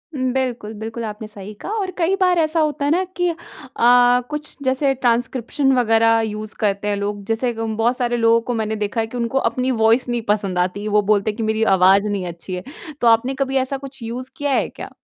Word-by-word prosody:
बिल्कुल, 255 -4 -2
बिल्कुल। 225 +2 -6
आपने 215 0 -6
सही 210 -1 -10
कहा - - -5
और 380 -2 -2
कई 360 +2 +2
बार 360 -1 +4
ऐसा 320 0 +1
होता 300 -2 0
है 290 - +1
न 360 +4 +2
कि 355 -1 +1
अ, 335 - -2 0.9
कुछ 300 0 -5
जैसे 265 +1 +1
ट्रांसक्रिप्शन 255 +2 0
वग़ैरह 225 -1 +4
यूज़ 215 0 -6
करते 205 -1 0
हैं 205 - +1
लोग। 205 0 -3
जैसे 230 +3 -1
ग 225 0 -4
बहुत 240 +2 +2
सारे 240 -1 0
लोगों 230 0 +4
को 245 - 0
मैंने 220 -1 -2
देखा 210 +2 -2
है 225 - -3
कि 245 - -7
उनको 235 +3 -1
अपनी 255 +1 -1
वॉइस 225 +2 +3
नहीं 240 -1 -1
पसंद 200 -4 0
आती। 195 +4 -1
वो 210 0 +3
बोलते 210 +1 +2
हैं - - -12
कि 225 - -2
मेरी 220 0 0
आवाज़ 195 +3 +5
नहीं 200 -3 -2
अच्छी 175 +2 -6
है। 180 - -6 0.4
तो 240 - +3
आपने 230 +4 +4
कभी 270 0 -4
ऐसा 265 +1 0
कुछ 270 -1 -10
यूज़ 245 +3 -5
किया 290 -1 -1
है - - +1
क्या? - - -9
230 Hz, 225 wpm, -20 LUFS, 210-265 Hz, 0.9 s, आवाज़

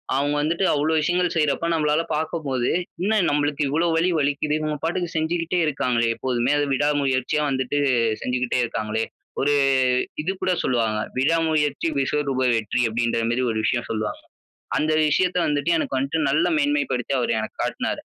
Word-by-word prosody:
அவுங்க 145 +2 +1
வந்துட்டு 165 +5 0
அவ்ளோ 150 +2 +1
விஷயங்கள் 175 +3 0
செய்றப்ப 150 0 +1
நம்மளால 150 -1 +2
பாக்கும்போது, 150 -5 -2 0.3
என்ன 205 +4 +1 0.2
நம்மளுக்கு 145 0 0
இவ்ளோ 165 +5 +1
வலி 170 +3 +2
வலிக்கிதே. 145 +1 0
இவுங்க 155 -1 -2
பாட்டுக்கு 175 +1 -1
செஞ்சுகிட்டே 165 +2 0
இருக்காங்களே, 125 -5 0
எப்போதுமே! 125 +1 0
அது 145 - +1
விடா 145 +2 +2
முயற்சியா 135 +2 0
வந்துட்டு 130 +1 -1 0.4
செஞ்சுகிட்டே 125 0 -1
இருக்காங்களே. 110 -1 -2 0.4
ஒரு 145 +2 +2 0.7
இதுகூட 185 +3 -2
சொல்லுவாங்க, 115 -4 0 0.2
"விடா 150 +6 +3
முயற்சி 150 -1 0
விஸ்வரூப 140 -1 0
வெற்றி" 115 +2 -1
அப்பிடின்ற 115 0 0
மாரி 125 - 0
ஒரு 110 - -3
விஷயம் 120 0 0
சொல்லுவாங்க. 110 -1 -3 0.6
அந்த 155 +1 +1
விஷயத்த 180 +4 +1
வந்துட்டு 145 +1 0
எனக்கு 145 - -2
வந்துட்டு 140 +4 -1
நல்ல 145 +3 +2
மேன்மைப்படுத்தி 290 0 0
அவரு - - 0
எனக்கு - - -5
காட்டுனாரு. - - -2
145 Hz, 150 wpm, -23 LUFS, 130-160 Hz, 0.7 s, விடா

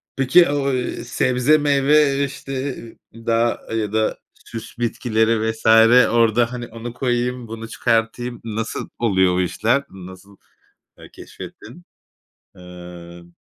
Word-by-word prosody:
Peki, 140 +5 +4
o, 140 -2 0
eee, 125 -1 -3
sebze 125 +4 +2
meyve, 140 0 +3
işte, 135 0 -8
e - - -2 0.2
eee, 115 0 -14
dağ 115 +1 +1
ya 105 -1 -2
da 110 0 0 0.3
süs 115 +1 -9
bitkileri 110 -1 0
vs. 110 - -14 0.5
orada, 115 +1 +2
hani, 120 -1 -6
"Onu 115 +1 -8
koyayım, 125 -1 -2
bunu 115 0 -7
çıkartayım," 120 +1 -1
nasıl 115 0 -4
oluyor 95 -6 +2
o 90 - +1
işler, 110 +10 0
nasıl, 95 +1 -13 0.6
ııı, - - -13
keşfettin? 135 +11 -12 0.7
Iıı 85 -1 -12
115 Hz, 125 wpm, -20 LUFS, 110-125 Hz, 0.7 s, Peki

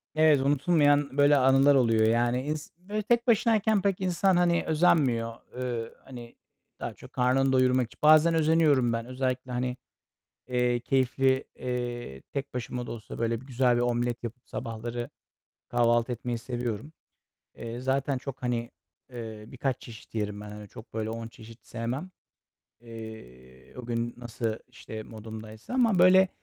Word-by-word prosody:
Evet, 155 -3 +5
unutulmayan 145 0 +3
böyle 145 0 +6
anılar 135 +2 +5
oluyor. 115 -4 +4
Yani, 120 +2 +2
ins 150 +1 -4
böyle 205 +4 -4
tek 235 +3 +1
başınayken 220 -2 +3
pek 195 -1 0
insan, 185 0 +2
hani, 170 -1 +3
özenmiyor. 135 -8 +2 0.2
Eee, 120 -3 -3
hani, 120 -3 -11 0.4
daha - - -4
çok - - -15
karnını 130 +2 +2
doyurmak 130 -1 +3
için - - -20
bazen 155 +2 +7
özeniyorum 155 -6 +3
ben 115 0 -2
özellikle, 130 0 -3
hani, 125 +1 -2 0.7
eee, 125 -1 +1
keyifli, 130 +1 +2
eee, 120 - -4
tek 140 -1 -6
başıma 125 0 -4
da - - -5
olsa 110 -2 -8
böyle 115 0 0
bir - - -14
güzel 125 -2 +2
bir 120 - +1
omlet 120 0 -1
yapıp 120 +2 -8
sabahları 120 +1 -5 0.6
kahvaltı 120 0 +2
etmeyi 120 0 -3
seviyorum. 120 +2 -4 0.7
Eee, 115 +1 -6
zaten 135 +1 0
çok, 130 0 -8
hani, 120 -1 -1 0.4
eee, 110 -3 -7
birkaç 130 0 -3
çeşit 115 -1 -12
yerim 105 -1 -2
ben. 105 0 -8
Hani, 105 0 -9
çok 110 +3 -13
böyle 110 0 -2
10 115 0 -5
çeşit 115 +1 -14
sevmem. 120 +10 -4 0.7
Eee, 65 - -12
o 125 - -7
gün 120 0 -2
nasıl, 115 -2 -3
işte, 110 0 -8
modumdaysa 110 - -9
ama 230 -7 +3
böyle 185 +1 +7
125 Hz, 150 wpm, -28 LUFS, 115-145 Hz, 0.7 s, bazen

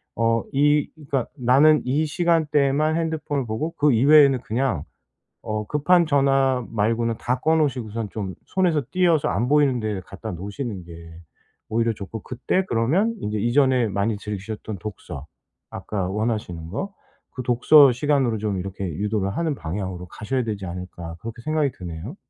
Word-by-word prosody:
어 115 0 +1
이 145 +1 +3
그니까 140 -5 -2
나는 140 +5 +5
이 140 +5 +1
시간대에만 155 -2 +2
핸드폰을 155 -4 -2
보고 110 +10 -2
그 150 0 +4
이외에는 140 +1 +6
그냥 115 - -1 0.6
어 110 0 -3
급한 170 +6 +3
전화 135 -3 +2
말고는 115 +1 0
다 125 +1 -1
꺼 160 +3 +3
놓으시고선 115 -7 -1
좀 95 -4 -5
손에서 180 -5 +1
떼어서 175 -5 +3
안 110 +8 0
보이는 145 -4 +3
데에 105 -3 -2
갖다 110 +3 -7
놓으시는 100 - -6
게 85 -1 -11 0.6
오히려 115 +1 +1
좋고 105 +1 -7
그때 130 +9 -1
그러면 165 - +1
인제 105 - -3
이전에 125 +1 +3
많이 100 +2 -1
즐기셨던 105 0 -6
독서, 90 -8 -8 0.4
아까 95 -4 -4
원하시는 105 -6 -3
거. 195 - -4 0.4
그 130 - -5
독서 130 +4 +6
시간으로 130 -3 +1
좀 105 -2 -2
이렇게 95 +1 -5
유도를 100 +3 -2
하는 160 -3 0
방향으로 90 -1 -5
가셔야 125 +8 -3
되지 105 -4 -4
않을까 85 -2 -7
그렇게 115 +1 -7
생각이 155 -1 +1
드네요. 90 - -7
120 Hz, 345 characters per minute, -23 LUFS, 105-145 Hz, 0.6 s, 이외에는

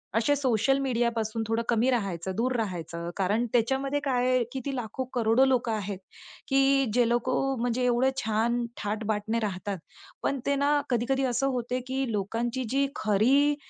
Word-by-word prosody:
असे 235 +6 +3
सोशल 270 -1 +2
मीडियापासून 235 -4 0
थोडं 225 +1 0
कमी 235 +2 +3
राहायचं, 190 -7 -1
दूर 250 +4 0
राहायचं 170 -6 -3
कारण 205 +5 +1
त्याच्यामध्ये 270 +4 +1
काय 250 -2 +1
आहे 255 -1 +3
की 265 - -3
ती 275 -1 -2
लाखो 245 +1 -3
करोडो 240 +1 +4
लोकं 250 -3 +1
आहेत 205 -3 -3 0.5
की 275 0 +3
जे 240 0 +3
लोकं 255 +3 +1
म्हणजे 245 +1 0
एवढं 250 +2 +3
छान 230 +2 +1 0.2
थाट-बाट 210 0 -1
ने 230 - +2
राहतात, 200 -2 -3 0.5
पण 275 - 0
ते 280 - +2
ना 285 +1 +2
कधी-कधी 260 +2 +1
असं 255 +2 +1
होते 245 +1 -2
की 265 +1 -1
लोकांची 230 +5 -2
जी 275 +3 +2
खरी 260 +8 +3
240 Hz, 160 wpm, -27 LUFS, 220-265 Hz, 0.5 s, करोडो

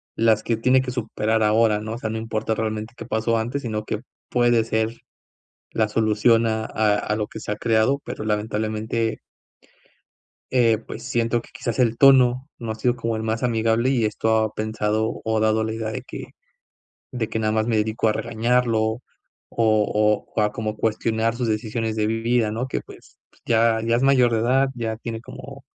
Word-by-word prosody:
las 110 -1 +3
que 115 - 0
tiene 130 +3 +3
que 130 -1 -4
superar 110 -2 -1
ahora, 110 0 +3
¿no? 110 +1 -5
O - - -4
sea, 110 -2 -4
no 110 - -3
importa 110 0 -2
realmente 110 +1 -3
qué - - -7
pasó 115 +1 0
antes, 120 +5 -2
sino 110 -3 -3
qué 105 - -3 0.3
puede 120 -2 +3
ser 110 +1 -1 0.7
la 110 -1 +1
solución 110 +2 +3
a 110 0 -1
a 110 -2 +1
a 105 - -1
lo 105 -1 -1
que - - -9
se - - -4
ha - - -3
creado, 115 +5 +2
pero - - -6
lamentablemente 110 +1 -1 1.3
eh, 115 -3 +4
pues 110 - -9
siento 120 -1 0
que - - -18
quizás 125 -2 -4
el 120 -3 +2
tono 130 0 +5
no 115 -2 -4
ha - - -7
sido 120 +3 0
como 115 -1 -2
el 110 - -4
más 110 +1 -2
amigable 115 +1 +2
y 125 -4 +1
esto 110 +1 +1
ha 110 -1 0
pensado, 110 0 -1
o 110 0 0
ha - - +1
dado 110 0 +2
la 110 - -2
idea 110 -1 -3
de - - -5
que - - -9 0.8
de 120 -4 -2
que 110 - -2
nada 110 -1 +1
más 110 0 +1
me 115 -2 +1
dedico 110 +1 0
a 110 - +3
regañarlo 115 +1 +1
o 110 +2 -2 0.5
o, 105 -1 +1
a 105 0 +2
como 110 -4 -3
cuestionar 110 +1 0
sus 120 -1 -2
decisiones 110 0 -2
de 110 -1 0
vida, 115 0 +1
¿no?, 115 +4 -3
que - - -3
pues - - -16
pues - - -29
ya 115 -1 +3
ya 115 +1 +2
es - - -1
mayor 130 -3 +4
de 110 - +2
edad, 130 +4 +2
ya 115 -2 -3
tiene 115 -1 -6
como 135 +3 -10
110 Hz, 200 wpm, -23 LUFS, 110-120 Hz, 1.3 s, tono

